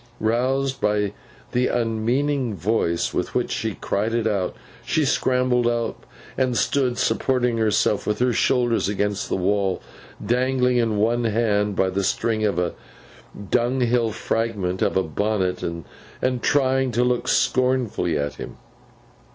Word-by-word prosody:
Roused 130 +4 0
by 105 -1 +1 0.4
the 125 +1 +2
unmeaning 120 +2 0
violence 95 -4 0
with - - -2
which - - 0
she - - -2
cried 110 +3 -1
it 115 -1 0
out, 100 -4 -1 0.3
she 155 +5 +1
scrambled 125 -2 +2
up, 120 -1 -2 0.3
and 130 -2 0
stood 130 -4 +1
supporting 125 0 +1
herself 105 -1 +1
with 105 - 0
her 125 +1 +2
shoulders 120 -3 +2
against 105 0 -1
the - - 0
wall; 95 0 0 0.5
dangling 125 +1 +2
in 115 -3 +1
one 115 +3 +1
hand 105 -2 +1
by 95 - +2
the 100 +1 -1
string, 110 +3 0
a 90 -5 0 0.8
dunghill 120 -1 +2
fragment 105 -4 -2
of - - +1
a 95 - +2
bonnet, 95 +2 -1
and 115 +9 -4
trying 135 0 +2
to 120 - +2
look 125 -1 0
scornfully 125 - +1
at 70 -1 -3
him. - - -8
115 Hz, 135 wpm, -23 LUFS, 105-125 Hz, 0.8 s, the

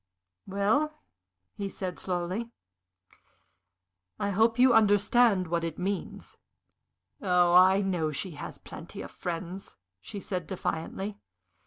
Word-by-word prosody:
"Well," 220 +11 +1 0.6
he 200 -1 -4
said, 185 -2 -5
slowly, 185 +5 -2 1.7
"I 205 - -1
hope 225 +4 +3
you 255 0 +6
understand 210 -1 +4
what 170 0 -1
it 165 -2 -3
means?" 195 +2 -4 0.8
"Oh, 180 -3 +3
I 185 +2 +7
know 180 -5 0
she 155 +5 -4
has 150 - -7
plenty - - -9
of - - -9
friends!" 180 +2 -5 0.2
she 200 - -7
said, 180 -4 -4
defiantly. 190 +3 -4
190 Hz, 115 wpm, -29 LUFS, 175-205 Hz, 1.7 s, I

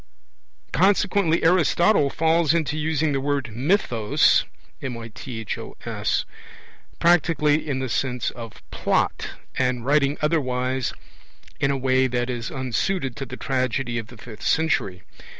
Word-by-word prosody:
Consequently 190 -2 +3
Aristotle 175 -1 +4
falls 165 +1 +2
into 155 -3 0
using 155 0 0
the 135 -1 0
word 140 -3 -1
mythos 125 - +2 2.5
practically 155 -3 +3
in 135 - 0
the 130 0 -2
sense 125 0 -1
of 115 -3 -10
'plot', - - 0 0.3
and 125 -2 0
writing 140 0 +2
otherwise 130 -5 0 0.6
in 140 - +2
a 140 - +1
way 130 0 +2
that 120 0 -1
is 120 -1 -4
unsuited 130 - -2
to 135 - -5
the 130 - -7
tragedy 130 -2 -1
of 110 - -7
the 120 - -14
fifth 110 -1 -11
century. 100 - 0
135 Hz, 115 wpm, -23 LUFS, 125-160 Hz, 2.5 s, Aristotle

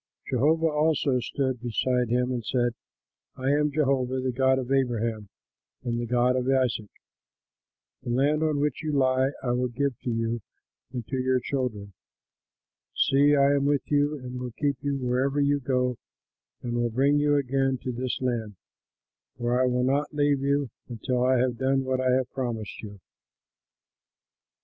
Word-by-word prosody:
Jehovah 155 +6 +2
also 150 -3 +2
stood 130 0 -2
beside 125 +1 0
him 125 +1 +1
and 120 -2 -2
said, 120 0 0 0.6
"I 130 +1 0
am 150 +1 +2
Jehovah, 135 -3 +1
the 130 0 -1
God 130 +1 +2
of 130 0 -4
Abraham 115 -5 0 0.5
and 120 -1 -2
the 120 - -3
God 125 +1 +2
of 130 0 -1
Isaac. 125 -5 +1 1.1
The - - -7
land 140 +5 +2
on 155 -2 +1
which 145 -2 -1
you 155 -1 -2
lie 130 -1 +3
I 125 - 0
will 125 +1 +1
give 130 +1 -2
to - - -4
you 115 0 -1 0.5
and 125 -3 -5
to 130 - -3
your 130 0 +2
children. 120 -7 -3 1.0
See, 145 +2 +4
I 140 0 +4
am 140 -1 +1
with 145 0 0
you, 145 +1 +2
and 125 -1 -7
will 125 -2 -5
keep 145 -2 +1
you 140 -1 -1
wherever 130 +2 0
you 145 0 +2
go 125 -2 0 0.7
and 120 - -3
will 120 0 0
bring 140 +5 +2
you 145 0 +3
again 135 -1 +1
to 130 - -2
this 125 0 -3
land; 115 -5 -2 0.8
for 120 +1 +1
I 130 - +3
will 125 0 +1
not 140 +3 0
leave 145 -1 +2
you 140 -2 0 0.2
until 125 +2 -1
I 130 0 +3
have 125 -1 0
done 135 0 +1
what 130 0 -1
I 130 - +1
have 130 0 +1
promised 115 -6 -4
you." 100 -2 -9
130 Hz, 170 wpm, -26 LUFS, 120-140 Hz, 1.1 s, See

